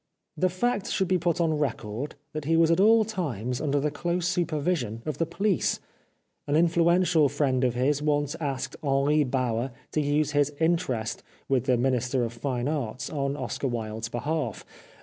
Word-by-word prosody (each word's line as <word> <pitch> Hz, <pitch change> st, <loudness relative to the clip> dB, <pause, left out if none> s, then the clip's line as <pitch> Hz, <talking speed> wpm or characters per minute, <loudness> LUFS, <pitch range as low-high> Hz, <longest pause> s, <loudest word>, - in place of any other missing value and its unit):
The 185 Hz, -, +2 dB
fact 205 Hz, +3 st, -1 dB
should 190 Hz, -, +1 dB
be 185 Hz, 0 st, +2 dB
put 170 Hz, 0 st, 0 dB
on 160 Hz, -3 st, +1 dB
record 130 Hz, -2 st, -3 dB, 0.2 s
that 155 Hz, -2 st, -4 dB
he 165 Hz, +2 st, +3 dB
was 165 Hz, 0 st, +5 dB
at 165 Hz, -, +3 dB
all 220 Hz, +2 st, +6 dB
times 125 Hz, -, -3 dB
under 145 Hz, -1 st, +1 dB
the 150 Hz, +1 st, 0 dB
close 175 Hz, +3 st, -1 dB
supervision 155 Hz, -, -1 dB
of 155 Hz, -, -4 dB
the 165 Hz, -, +1 dB
police. 195 Hz, +2 st, 0 dB, 0.7 s
An 145 Hz, -, +1 dB
influential 170 Hz, -1 st, +4 dB
friend 135 Hz, -2 st, +1 dB
of 125 Hz, -2 st, +1 dB
his 140 Hz, +4 st, +1 dB
once 145 Hz, -1 st, 0 dB
asked 140 Hz, -4 st, -3 dB
Henri 145 Hz, +1 st, +2 dB
Bauer 125 Hz, -2 st, -1 dB, 0.2 s
to 155 Hz, -, +1 dB
use 150 Hz, 0 st, +1 dB
his 145 Hz, 0 st, +2 dB
interest 160 Hz, -9 st, 0 dB, 0.3 s
with 130 Hz, -3 st, +1 dB
the 130 Hz, -2 st, +3 dB
Minister 125 Hz, 0 st, +1 dB
of 115 Hz, 0 st, -3 dB
Fine 125 Hz, 0 st, -2 dB
Arts 130 Hz, -5 st, -3 dB
on 140 Hz, -2 st, -1 dB
Oscar 140 Hz, -, -3 dB
Wilde's 110 Hz, -2 st, -3 dB
behalf. 140 Hz, -1 st, -3 dB
145 Hz, 170 wpm, -27 LUFS, 130-165 Hz, 0.7 s, all